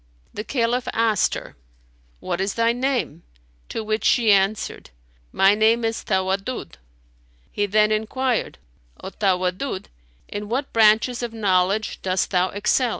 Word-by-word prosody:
The 210 - -5
Caliph 240 0 -1
asked 220 -4 +2
her, - - -9 0.7
"What 180 0 -3
is 195 +1 -2
thy 230 0 +2
name?"; 245 - -2 0.5
to 225 - -4
which 215 +1 -2
she 230 -4 +4
answered, 195 - 0 0.4
"My 195 +1 +4
name 225 +2 +3
is 225 0 -2
Tawaddud."[FN#294] 190 - -2 0.8
He 205 0 -1
then 215 +1 +3
enquired, 230 +3 -1 0.5
"O 190 - -6
Tawaddud, 185 +3 -1 0.4
in 205 0 -6
what 270 +4 -2
branches 225 +2 +4
of 240 -2 -4
knowledge 200 0 0
dost 185 0 -1
thou 185 -1 +2
excel?" 210 +5 +1
215 Hz, 135 wpm, -22 LUFS, 195-230 Hz, 0.8 s, she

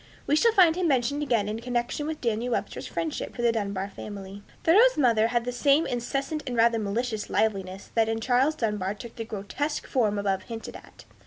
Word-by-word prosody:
We 290 - +2
shall 460 +9 +4
find 355 -6 +6
him 365 -1 0
mentioned 275 +1 +1
again, 235 -8 +1
in 215 +2 -3
connection 245 +4 -2
with 315 -1 -4
Daniel 235 +1 -1
Webster's - - -3
friendship 320 -2 -4
for 240 - -4
the 235 - +4
Dunbar 200 -3 -2
family. 200 0 -8 0.2
Thoreau's 450 +10 +5
mother 230 -5 +4
had 240 0 0
this 245 0 -4
same 285 +4 +4
incessant 275 +5 -2
and 245 -2 -3
rather 230 0 +4
malicious 215 +1 -2
liveliness 195 -3 -1
that 225 -1 +2
in 225 0 -1
Charles 255 +6 +2
Dunbar 210 -6 -1
took 230 +2 -10
the 225 -2 -5
grotesque 225 +9 -3
form 215 -6 +1
above 195 -1 0
hinted 225 -1 -7
at. - - -14
235 Hz, 195 wpm, -26 LUFS, 210-280 Hz, 0.2 s, find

